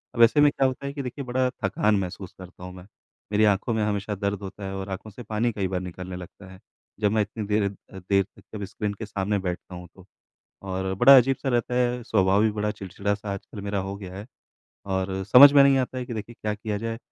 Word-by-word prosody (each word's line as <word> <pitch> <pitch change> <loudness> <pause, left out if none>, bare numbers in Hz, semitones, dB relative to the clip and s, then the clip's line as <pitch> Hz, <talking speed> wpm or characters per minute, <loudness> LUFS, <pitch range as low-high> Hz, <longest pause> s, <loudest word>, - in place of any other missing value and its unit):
अब 115 - +1
ऐसे 120 +6 +5
में 145 0 +6
क्या 135 -1 +2
होता 130 +1 -5
है 140 - -4
कि 145 - -4
देखिए 130 +2 -6
बड़ा 125 +1 +1
थकान 105 +2 +2
महसूस 95 0 -6
करता 90 -1 -12
हूँ 90 0 -8
मैं, 90 +1 -12 0.4
मेरी 105 +1 +3
आँखों 105 +3 +1
में 110 - 0
हमेशा 105 0 -2
दर्द 100 0 -2
होता 100 +1 -8
है 95 0 -5
और 95 0 -5
आँखों 95 +3 -6
से 120 +4 -10
पानी 110 +3 -1
कई 100 -3 -1
बार 90 -1 -2
निकलने 90 0 -7
लगता 95 +2 -11
है। 95 - -13 0.4
जब 105 -1 +2
मैं 110 - +2
इतनी 105 +1 -4
देर 105 0 +1
अ, 100 -1 -8
देर 100 +2 +2
तक - - -21
जब 100 - -5
स्क्रीन 100 +1 -4
के 110 +2 -7
सामने 100 0 -2
बैठता 90 -1 -5
हूँ 90 0 -9
तो 95 -1 -16 0.7
और 95 0 -2
बड़ा 130 +8 +8
अजीब-सा 135 +2 +2
रहता 120 0 0
है, 125 0 +1
स्वभाव 100 -2 +3
भी 110 - +3
बड़ा 105 0 -1
चिड़चिड़ा-सा 100 +2 -4
आजकल 100 +1 -9
मेरा 100 0 -2
हो 95 +1 -5
गया 95 -2 -9
है 100 +2 -8 0.6
और 95 0 -2
समझ 130 +7 +9
में 140 -1 +7
नहीं 140 -1 +5
आता 130 0 -2
है 125 - -3
कि 120 - -5
देखिए 110 +2 -6
क्या 105 -1 -1
किया 105 -1 -4
जाए 115 +1 -4
105 Hz, 240 wpm, -25 LUFS, 95-115 Hz, 0.7 s, समझ